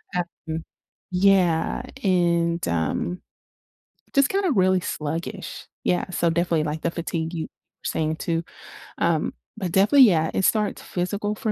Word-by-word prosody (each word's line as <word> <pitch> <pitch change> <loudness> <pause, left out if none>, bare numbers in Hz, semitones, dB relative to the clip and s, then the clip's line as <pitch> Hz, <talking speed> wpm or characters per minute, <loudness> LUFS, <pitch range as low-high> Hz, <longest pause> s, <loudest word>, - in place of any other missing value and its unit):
Um, 165 -2 -4 0.5
yeah, 180 -3 +3 0.2
and, 170 -3 +2
um, 85 - -1 0.9
just 275 0 +5
kinda 390 -3 +1
really 185 -3 +4
sluggish. 165 +7 -5 0.2
Yeah, 180 +1 0
so 170 -1 +1
definitely, 170 -2 +1
like, 155 +1 -3
the - - +2
fatigue 165 -1 -3
you 160 - -3 0.4
saying 155 0 -1
too. 165 0 -1 0.6
Um, 160 -2 +1 0.2
but 185 -5 -3
definitely, 215 +9 +6
yeah, 160 -3 +2
it 190 - +2
starts 215 -2 +1
physical 205 +4 -2
for 215 - -1
175 Hz, 130 wpm, -24 LUFS, 165-195 Hz, 0.9 s, definitely